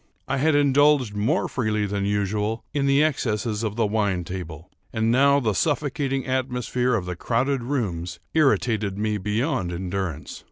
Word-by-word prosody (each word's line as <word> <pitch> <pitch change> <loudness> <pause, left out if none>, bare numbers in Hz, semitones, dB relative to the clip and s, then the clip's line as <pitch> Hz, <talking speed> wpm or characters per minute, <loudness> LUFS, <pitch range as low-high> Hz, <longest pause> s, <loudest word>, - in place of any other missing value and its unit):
I - - 0
had 150 +3 +2
indulged 145 -4 +4
more 110 - 0
freely 110 -4 -1
than 100 0 -2
usual 105 +2 -1
in 140 -1 +1
the 140 +2 +4
excesses 110 -7 -1
of 110 -2 -2
the 115 -1 +1
wine 100 -4 0
table; 85 -2 -7 0.2
and 110 0 +1
now 140 +3 +4
the 110 -6 0
suffocating 140 - -1
atmosphere 125 -1 0
of 95 -5 -2
the 90 0 -4
crowded 125 +8 0
rooms 95 -10 -3
irritated 115 -9 +2
me 105 0 -1
beyond 105 - -1
endurance. 90 -3 -4
110 Hz, 155 wpm, -24 LUFS, 100-135 Hz, 0.2 s, indulged